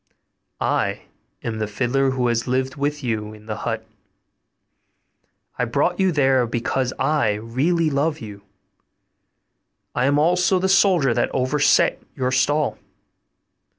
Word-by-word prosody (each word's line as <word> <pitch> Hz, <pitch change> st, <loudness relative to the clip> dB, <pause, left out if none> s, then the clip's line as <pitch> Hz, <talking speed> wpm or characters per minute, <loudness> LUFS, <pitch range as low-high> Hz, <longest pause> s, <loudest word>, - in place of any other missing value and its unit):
I -, -, -1 dB, 0.4 s
am 110 Hz, -2 st, -3 dB
the 110 Hz, -, -1 dB
fiddler 125 Hz, +6 st, 0 dB
who 130 Hz, -1 st, -1 dB
has 120 Hz, 0 st, 0 dB
lived 130 Hz, +1 st, -1 dB
with 145 Hz, +1 st, -2 dB
you 110 Hz, -3 st, -3 dB
in 105 Hz, 0 st, -16 dB
the 110 Hz, 0 st, -5 dB
hut. 110 Hz, 0 st, -4 dB, 1.7 s
I 125 Hz, -, +2 dB
brought 145 Hz, +9 st, 0 dB
you 190 Hz, -1 st, +3 dB
there 135 Hz, -5 st, +2 dB
because 120 Hz, +2 st, -1 dB
I 135 Hz, -6 st, +1 dB
really 140 Hz, +10 st, 0 dB
loved 150 Hz, +3 st, 0 dB
you. 105 Hz, -5 st, -9 dB, 1.5 s
I 125 Hz, +2 st, +1 dB
am 145 Hz, +1 st, +2 dB
also 180 Hz, +4 st, +3 dB
the 185 Hz, +1 st, 0 dB
soldier 185 Hz, -, +4 dB
that -, -, 0 dB
overset 140 Hz, +3 st, +2 dB
your 130 Hz, -2 st, -1 dB
stall. 145 Hz, +3 st, +1 dB
130 Hz, 130 wpm, -22 LUFS, 115-150 Hz, 1.7 s, soldier